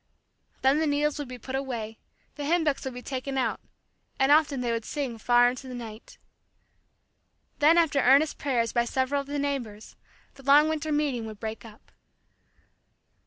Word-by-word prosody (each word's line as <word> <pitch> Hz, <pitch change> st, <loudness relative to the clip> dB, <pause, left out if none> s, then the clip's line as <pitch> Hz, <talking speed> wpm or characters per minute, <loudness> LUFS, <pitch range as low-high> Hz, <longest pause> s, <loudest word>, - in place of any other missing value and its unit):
Then 270 Hz, +3 st, +4 dB
the 320 Hz, -, +1 dB
needles 295 Hz, +1 st, 0 dB
would 290 Hz, -, -4 dB
be 250 Hz, 0 st, -8 dB
put 260 Hz, +2 st, -9 dB
away, 235 Hz, -5 st, -4 dB, 0.3 s
the 290 Hz, -, -7 dB
hymn 330 Hz, +3 st, +2 dB
books 295 Hz, -3 st, 0 dB
would 265 Hz, -, -4 dB
be 250 Hz, -, -8 dB
taken 270 Hz, 0 st, -4 dB
out, 260 Hz, -, 0 dB, 0.6 s
and 270 Hz, +1 st, +3 dB
often 295 Hz, -3 st, +4 dB
they 240 Hz, -1 st, -1 dB
would 230 Hz, -1 st, -2 dB
sing 255 Hz, -3 st, -4 dB
far 245 Hz, +1 st, +4 dB
into 255 Hz, +2 st, -4 dB
the 255 Hz, -, -7 dB
night. 235 Hz, -, -10 dB, 1.4 s
Then 310 Hz, +3 st, +5 dB
after 320 Hz, -4 st, +3 dB
earnest 275 Hz, +5 st, +4 dB
prayers 240 Hz, -6 st, 0 dB
by 235 Hz, 0 st, +2 dB
several 260 Hz, +3 st, 0 dB
of 275 Hz, -, -12 dB
the 290 Hz, +1 st, -3 dB
neighbors, 260 Hz, -7 st, -4 dB, 0.4 s
the 275 Hz, -, -15 dB
long 285 Hz, +3 st, +6 dB
winter 315 Hz, 0 st, -2 dB
meeting 285 Hz, -6 st, -1 dB
would 215 Hz, -2 st, -9 dB
break 220 Hz, 0 st, -6 dB
up. 220 Hz, -1 st, -16 dB
270 Hz, 175 wpm, -27 LUFS, 240-290 Hz, 1.4 s, long